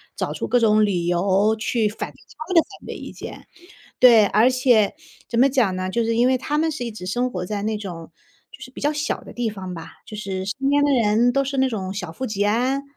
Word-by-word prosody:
找 -, -, -3 dB
出 -, -, -4 dB
各 245 Hz, -, +3 dB
种 215 Hz, -1 st, +4 dB
理 180 Hz, -4 st, -1 dB
由 190 Hz, +4 st, +2 dB
去 220 Hz, 0 st, 0 dB
反 210 Hz, -, -6 dB
他 315 Hz, +4 st, -9 dB
们 -, -, -3 dB
的 330 Hz, -, +8 dB, 0.2 s
反 -, -, -17 dB
对 -, -, -6 dB
意 -, -, -8 dB
见。 -, -, -9 dB, 0.5 s
对， 230 Hz, -4 st, +7 dB
而 215 Hz, +5 st, +4 dB
且 250 Hz, -5 st, +3 dB, 0.4 s
怎 235 Hz, -, 0 dB
么 265 Hz, -, +6 dB
讲 250 Hz, -8 st, +2 dB
呢？ 185 Hz, 0 st, -3 dB
就 235 Hz, +5 st, 0 dB
是 230 Hz, 0 st, 0 dB
因 240 Hz, +1 st, +4 dB
为 260 Hz, 0 st, +3 dB
他 290 Hz, +4 st, -2 dB
们 320 Hz, +1 st, +1 dB
是 300 Hz, -5 st, -4 dB
一 235 Hz, -, -4 dB
直 210 Hz, -4 st, -9 dB
生 245 Hz, +7 st, -1 dB
活 180 Hz, -1 st, -4 dB
在 205 Hz, +1 st, -4 dB
那 215 Hz, 0 st, -1 dB
种 175 Hz, -5 st, -8 dB, 0.4 s
就 -, -, -14 dB
是 255 Hz, -, -9 dB
比 -, -, -10 dB
较 295 Hz, -, +2 dB
小 300 Hz, 0 st, -2 dB
的 -, -, -12 dB
地 240 Hz, -2 st, -2 dB
方 190 Hz, -3 st, -7 dB
吧， 165 Hz, -2 st, -8 dB, 0.2 s
就 215 Hz, -, -9 dB
是 195 Hz, -2 st, -4 dB
身 270 Hz, +8 st, -2 dB
边 285 Hz, 0 st, +3 dB
的 290 Hz, -, +3 dB
人 235 Hz, -1 st, +3 dB
都 275 Hz, +2 st, +1 dB
是 275 Hz, +1 st, -4 dB
那 265 Hz, 0 st, +3 dB
种 190 Hz, -5 st, -4 dB
小 180 Hz, -4 st, -5 dB
富 260 Hz, +10 st, -5 dB
即 210 Hz, -4 st, -1 dB
安， 250 Hz, +6 st, +1 dB
220 Hz, 275 characters per minute, -22 LUFS, 200-255 Hz, 0.5 s, 的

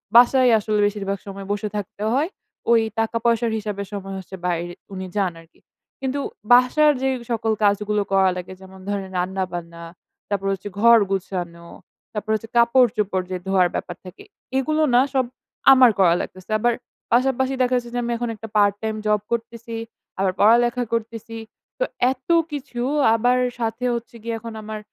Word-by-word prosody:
বাসায় 250 Hz, +1 st, +7 dB
আসলে 210 Hz, 0 st, -1 dB
বেশিরভাগ 200 Hz, -1 st, -3 dB
সময় 195 Hz, 0 st, -7 dB
বসে 205 Hz, +1 st, -1 dB
থাকতে 205 Hz, 0 st, -5 dB
হয়। 295 Hz, +7 st, +1 dB, 0.4 s
ওই 230 Hz, -1 st, +6 dB, 0.2 s
টাকা 225 Hz, +1 st, 0 dB
পয়সার 230 Hz, -1 st, +2 dB
হিসাবে 205 Hz, -1 st, -4 dB
সময় 195 Hz, -1 st, -6 dB
হচ্ছে 190 Hz, 0 st, -9 dB
বাইরে 175 Hz, -1 st, -1 dB, 0.2 s
উনি 190 Hz, 0 st, -5 dB
যান 190 Hz, -3 st, +1 dB
আরকি। 165 Hz, -, -24 dB, 0.4 s
কিন্তু 265 Hz, +1 st, -1 dB, 0.3 s
বাসার 255 Hz, +5 st, +6 dB
যে 265 Hz, -, +2 dB, 0.2 s
সকল 225 Hz, -1 st, 0 dB
কাজগুলো 210 Hz, +1 st, +2 dB
করা 190 Hz, -1 st, +4 dB
লাগে 180 Hz, +1 st, -7 dB
যেমন 190 Hz, 0 st, -13 dB
ধরেন 195 Hz, -2 st, -3 dB
রান্নাবান্না, 175 Hz, -2 st, -3 dB, 0.5 s
তারপর 195 Hz, -1 st, -1 dB
হচ্ছে 195 Hz, +2 st, -6 dB
ঘর 235 Hz, +1 st, +7 dB
গুছানো, 175 Hz, -3 st, -4 dB, 0.5 s
তারপর 215 Hz, 0 st, -5 dB
হচ্ছে 220 Hz, +1 st, -6 dB
কাপড়-চোপড় 235 Hz, -6 st, +3 dB
যে 185 Hz, -, -1 dB
ধোয়ার 190 Hz, -2 st, +4 dB
ব্যাপার 175 Hz, -, -4 dB
থাকে, 185 Hz, -, -11 dB, 0.3 s
এগুলো 310 Hz, +3 st, +1 dB
না 250 Hz, -, +7 dB
সব 260 Hz, -2 st, +2 dB, 0.5 s
আমার 255 Hz, -2 st, +7 dB
করা 180 Hz, -3 st, +6 dB
লাগতেছে। 185 Hz, +2 st, -9 dB
আবার 240 Hz, +1 st, +2 dB, 0.4 s
পাশাপাশি 265 Hz, +2 st, +2 dB
দেখা 255 Hz, 0 st, +2 dB
যাচ্ছে 240 Hz, -1 st, -5 dB
যে -, -, +1 dB
আমি 240 Hz, -, -2 dB
এখন 240 Hz, 0 st, -3 dB
একটা 220 Hz, +1 st, -9 dB
পার্ট-টাইম 205 Hz, +2 st, +2 dB
জব 210 Hz, -1 st, +2 dB
করতেছি, 230 Hz, 0 st, -4 dB, 0.4 s
আবার 190 Hz, -1 st, +2 dB
পড়ালেখা 240 Hz, +3 st, +4 dB
করতেছি। 230 Hz, 0 st, -4 dB, 0.4 s
তো -, -, +2 dB, 0.3 s
এত 260 Hz, 0 st, -9 dB, 0.2 s
কিছু 270 Hz, -4 st, -5 dB, 0.3 s
আবার 245 Hz, +2 st, +2 dB, 0.2 s
সাথে 230 Hz, +2 st, -2 dB
হচ্ছে 235 Hz, 0 st, -7 dB
গিয়ে 230 Hz, 0 st, -2 dB
এখন 230 Hz, 0 st, -8 dB
আমার 215 Hz, 0 st, -6 dB
215 Hz, 160 wpm, -22 LUFS, 195-240 Hz, 0.5 s, বাসায়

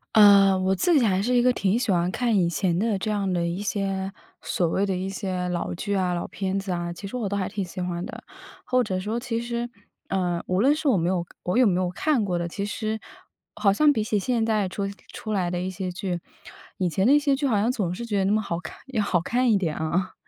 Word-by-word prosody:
呃， 200 Hz, -2 st, +7 dB
我 190 Hz, +1 st, +1 dB
自 335 Hz, -, +3 dB
己 245 Hz, -, +4 dB
还 190 Hz, -2 st, +2 dB
是 245 Hz, +4 st, 0 dB
一 240 Hz, -, +5 dB
个 250 Hz, +1 st, +4 dB
挺 200 Hz, -2 st, +1 dB
喜 245 Hz, -4 st, 0 dB
欢 175 Hz, -1 st, +2 dB
看 235 Hz, +4 st, 0 dB
以 175 Hz, -, +3 dB
前 175 Hz, 0 st, 0 dB
的 215 Hz, -1 st, +1 dB
这 215 Hz, +3 st, -2 dB
样 200 Hz, -3 st, 0 dB
的 175 Hz, -1 st, 0 dB
一 170 Hz, +3 st, -2 dB
些 195 Hz, -2 st, -2 dB, 0.3 s
所 175 Hz, -, 0 dB
谓 195 Hz, +4 st, +1 dB
的 195 Hz, -, -1 dB
一 185 Hz, +1 st, -3 dB
些 185 Hz, -2 st, -3 dB
老 175 Hz, -1 st, -2 dB
剧 200 Hz, +4 st, -3 dB
啊、 185 Hz, -2 st, +1 dB
老 175 Hz, -, -2 dB
片 190 Hz, 0 st, -3 dB
子 195 Hz, -1 st, -3 dB
啊， 175 Hz, -1 st, -2 dB
其 195 Hz, -, -9 dB
实 200 Hz, -, -4 dB
我 225 Hz, -4 st, -2 dB
都 200 Hz, -, -2 dB
还 195 Hz, 0 st, -1 dB
挺 200 Hz, -1 st, -3 dB
喜 180 Hz, +1 st, -7 dB
欢 175 Hz, 0 st, -3 dB
的。 -, -, -9 dB, 0.4 s
或 255 Hz, 0 st, +2 dB
者 195 Hz, -6 st, -1 dB
说 215 Hz, +5 st, -2 dB
其 235 Hz, -2 st, -2 dB
实， 235 Hz, 0 st, -3 dB, 0.4 s
呃， 180 Hz, -3 st, 0 dB
无 185 Hz, +2 st, +1 dB
论 275 Hz, +5 st, +5 dB
是 305 Hz, 0 st, -2 dB
我 260 Hz, -, +5 dB
没 170 Hz, -1 st, +1 dB
有 180 Hz, -2 st, 0 dB, 0.2 s
我 180 Hz, +6 st, 0 dB
有 255 Hz, -2 st, +6 dB
没 185 Hz, -2 st, +2 dB
有 180 Hz, -, 0 dB
看 270 Hz, -, +1 dB
过 180 Hz, -3 st, -1 dB
的， 170 Hz, -, -2 dB
其 200 Hz, +4 st, -4 dB
实 215 Hz, +1 st, -2 dB, 0.6 s
好 200 Hz, -2 st, +3 dB
像 295 Hz, +8 st, +5 dB
比 220 Hz, -6 st, 0 dB
起 215 Hz, -, +1 dB
现 230 Hz, +2 st, 0 dB
在 215 Hz, -4 st, +1 dB
出 200 Hz, +1 st, -3 dB, 0.2 s
出 215 Hz, -, -5 dB
来 180 Hz, -3 st, 0 dB
的 175 Hz, -, -1 dB
一 185 Hz, +1 st, -2 dB
些 185 Hz, 0 st, -4 dB
剧， 180 Hz, -1 st, -3 dB, 0.6 s
以 185 Hz, -, +1 dB
前 190 Hz, +3 st, 0 dB
的 255 Hz, -, +5 dB
一 295 Hz, -, +7 dB
些 285 Hz, -1 st, +2 dB
剧 285 Hz, +2 st, -2 dB
好 235 Hz, -6 st, +2 dB
像 210 Hz, +4 st, +2 dB
总 200 Hz, -9 st, -1 dB
是 235 Hz, -, -5 dB
觉 210 Hz, -3 st, -1 dB
得 -, -, +2 dB
那 195 Hz, -, +1 dB
么 215 Hz, +1 st, +3 dB
好 170 Hz, -5 st, -3 dB
看 160 Hz, -, -9 dB, 0.2 s
要 215 Hz, -, +2 dB
好 185 Hz, -3 st, +2 dB
看 245 Hz, +7 st, +1 dB
一 210 Hz, -, +5 dB
点 165 Hz, -6 st, -1 dB
啊。 170 Hz, +4 st, -1 dB
195 Hz, 285 characters per minute, -25 LUFS, 180-220 Hz, 0.6 s, 呃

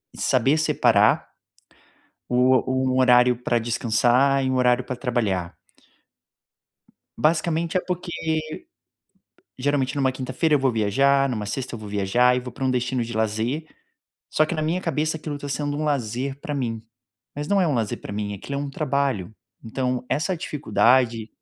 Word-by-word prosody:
saber 135 Hz, +4 st, +2 dB
separar 160 Hz, -, +3 dB, 1.0 s
o 125 Hz, +1 st, +4 dB
o 130 Hz, 0 st, 0 dB
um -, -, +2 dB
horário 125 Hz, -1 st, +5 dB
pra 120 Hz, -, +1 dB
descansar 120 Hz, +4 st, +2 dB
e -, -, 0 dB
um -, -, 0 dB
horário 125 Hz, 0 st, +3 dB
pra 130 Hz, -, -4 dB
trabalhar. 110 Hz, -9 st, -2 dB, 1.6 s
Basicamente 165 Hz, +2 st, +1 dB
é -, -, +3 dB
porque, 180 Hz, -1 st, -4 dB, 1.5 s
geralmente 135 Hz, 0 st, 0 dB
numa 135 Hz, -2 st, +1 dB
quinta-feira 130 Hz, +4 st, 0 dB
eu -, -, +4 dB
vou 135 Hz, -1 st, +2 dB
viajar, 135 Hz, +6 st, +2 dB
numa 105 Hz, -4 st, -3 dB
sexta 125 Hz, +5 st, -4 dB
eu -, -, -6 dB
vou 105 Hz, -1 st, -9 dB
viajar 105 Hz, +5 st, +2 dB
e -, -, 0 dB
vou 125 Hz, -1 st, -8 dB
pra 135 Hz, -, -9 dB
um 130 Hz, -, +2 dB
destino 125 Hz, 0 st, -1 dB
de 115 Hz, 0 st, -5 dB
lazer, 110 Hz, +8 st, -1 dB, 0.6 s
só 155 Hz, -, +2 dB
que 165 Hz, -, -3 dB
na 155 Hz, -, -2 dB
minha 165 Hz, +4 st, 0 dB
cabeça 160 Hz, -2 st, -1 dB
aquilo 150 Hz, -1 st, -5 dB
tá 145 Hz, 0 st, -7 dB
sendo 145 Hz, 0 st, -2 dB
um 155 Hz, -, -2 dB
lazer 135 Hz, -1 st, -2 dB
pra 150 Hz, -, -4 dB
mim. 115 Hz, -5 st, -3 dB, 0.5 s
Mas 145 Hz, +1 st, -5 dB
não 200 Hz, +2 st, +3 dB
é 180 Hz, -, +2 dB
um 150 Hz, -, +1 dB
lazer 115 Hz, -4 st, -2 dB
pra -, -, -8 dB
mim, 105 Hz, 0 st, -3 dB
aquilo 120 Hz, +8 st, -6 dB
é -, -, -2 dB
um 140 Hz, -, -5 dB
trabalho. 135 Hz, -8 st, -1 dB, 0.3 s
Então 125 Hz, +2 st, -2 dB
essa 165 Hz, +6 st, 0 dB
dificuldade 125 Hz, -7 st, +1 dB
130 Hz, 170 wpm, -23 LUFS, 120-145 Hz, 1.6 s, horário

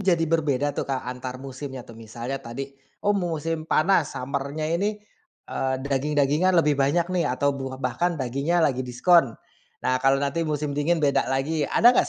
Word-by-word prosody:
jadi 175 Hz, -4 st, +2 dB
berbeda 145 Hz, -3 st, +1 dB
tuh, -, -, -4 dB
Kak, 135 Hz, -1 st, -2 dB
antar 125 Hz, 0 st, -5 dB
musimnya 135 Hz, -1 st, -7 dB
tuh? 115 Hz, -, -13 dB
Misalnya 120 Hz, +4 st, -5 dB
tadi 135 Hz, +4 st, -6 dB, 0.3 s
oh 205 Hz, -, +4 dB
musim 165 Hz, -4 st, -2 dB
panas, 165 Hz, -1 st, +2 dB
summer-nya 140 Hz, +3 st, -3 dB
ini, 205 Hz, +5 st, 0 dB, 0.6 s
eee, 130 Hz, 0 st, 0 dB
daging-dagingan 145 Hz, +5 st, +2 dB
lebih 150 Hz, -4 st, +3 dB
banyak 170 Hz, +6 st, +2 dB
nih 170 Hz, -4 st, +1 dB
atau 140 Hz, +3 st, +1 dB
bu 135 Hz, -1 st, -5 dB
bahkan 135 Hz, +7 st, -1 dB
dagingnya 140 Hz, +6 st, +1 dB
lagi 130 Hz, -4 st, +1 dB
diskon. 130 Hz, +1 st, +3 dB, 0.5 s
Nah, 130 Hz, 0 st, +1 dB
kalau 135 Hz, +1 st, +4 dB
nanti 140 Hz, +3 st, -1 dB
musim 150 Hz, -1 st, -1 dB
dingin 155 Hz, +3 st, +1 dB
beda 140 Hz, -1 st, +2 dB
lagi. 140 Hz, +3 st, 0 dB
Ada 240 Hz, +1 st, +6 dB
enggak -, -, +2 dB
140 Hz, 170 wpm, -25 LUFS, 130-165 Hz, 0.6 s, Ada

